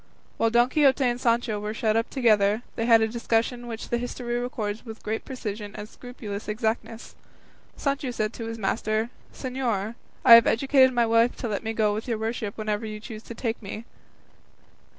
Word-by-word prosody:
While 230 - +3
Don 240 +1 +4
Quixote 275 -1 +3
and 245 -1 0
Sancho 230 -2 +1
were 210 +1 -4
shut 220 -1 +1
up 230 +1 +1
together, 215 -3 +3
they 230 - -1
had 230 -1 +7
a - - +2
discussion 235 +1 -1
which 225 -1 -6
the 240 - 0
history 240 0 -3
records 220 -4 -3
with 225 -2 -10
great 220 +1 -3
precision 210 -5 -6
and 210 - -7
scrupulous 220 -4 -8
exactness. 225 +1 -3 0.6
Sancho 280 -1 -1
said 220 -2 -2
to 230 - -6
his 225 0 -5
master, 215 +2 -1 0.2
"Señor, 240 -5 -2 0.3
I - - +10
have 230 0 +9
educed 265 +2 +4
my 240 -2 +2
wife 230 +1 +3
to 240 - -4
let 210 -3 -2
me 225 0 -2
go 215 -2 +2
with 215 +4 -4
your 230 -2 -1
worship 220 -2 -3
wherever 215 0 -2
you 215 -1 -5
choose 215 0 -8
to 235 - -10
take 230 0 -3
me." 215 +2 -7
225 Hz, 190 wpm, -26 LUFS, 215-240 Hz, 0.6 s, I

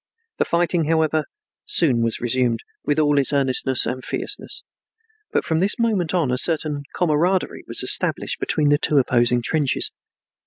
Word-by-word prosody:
The - - +2
fighting, 170 -1 0
however, 160 -1 +1 0.4
soon 150 - +3
was 115 -1 -1
resumed 120 -1 0 0.2
with 145 - -1
all 145 -2 +3
its 135 - +2
earnestness 130 -2 +2
and 130 0 -4
fierceness, 415 - -4 0.7
but - - 0
from 160 -1 0
this 195 +4 +1
moment 215 -8 0
on 160 -8 +1
a 125 - +1
certain 150 -2 +1
camaraderie 175 +3 0
was - - -2
established - - +1
between 150 -1 +1
the 145 0 +3
two 150 - +2
opposing 120 -2 +2
trenches. 145 0 0
150 Hz, 155 wpm, -21 LUFS, 130-165 Hz, 0.7 s, soon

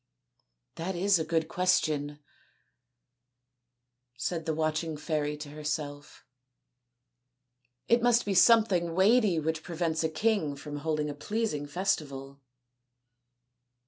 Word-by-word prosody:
" - - -49
That 185 +2 -3
is 190 +1 +3
a - - 0
good 160 0 0
question," 155 -5 0 2.0
said 160 +5 -3
the 160 - +1
watching 155 0 -1
fairy 150 -1 -2
to 150 -1 -8
herself; 150 -1 -5 0.8
" 125 0 -51
it 235 0 +4
must 240 0 +3
be 200 - 0
something 185 -5 +4
weighty 200 -2 +4
which 160 +1 -2
prevents 165 -1 -2
a 160 - +1
king 160 -3 0
from 145 +1 -7
holding 150 0 -1
a 145 - -4
pleasing 150 -2 -3
festival." 140 -5 -3
155 Hz, 115 wpm, -29 LUFS, 145-180 Hz, 2.0 s, it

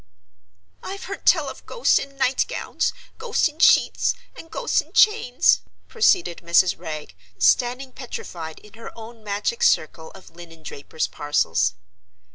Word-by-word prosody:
"I've 395 0 -7
heard 395 - -8
tell - - +4
of - - -9
ghosts 480 - +2
in 275 0 -9
night 265 -1 +1
gowns, - - -2 0.3
ghosts 465 -5 +1
in 305 +1 -12
sheets, - - +4 0.2
and 330 - -12
ghosts 485 +6 0
in - - -21
chains," 425 - +4 0.3
proceeded 370 - +2
Mrs. 170 +1 +3
Wragge, 150 - -8 0.2
standing 255 +2 +2
petrified 175 -11 -8
in 210 - -18
her 230 +1 -10
own 225 0 -11
magic 210 - -2
circle 160 - +1
of 190 - -15
linen 165 -1 -14
drapers' 155 +1 -4
parcels. 95 - 0
230 Hz, 140 wpm, -23 LUFS, -, 0.3 s, tell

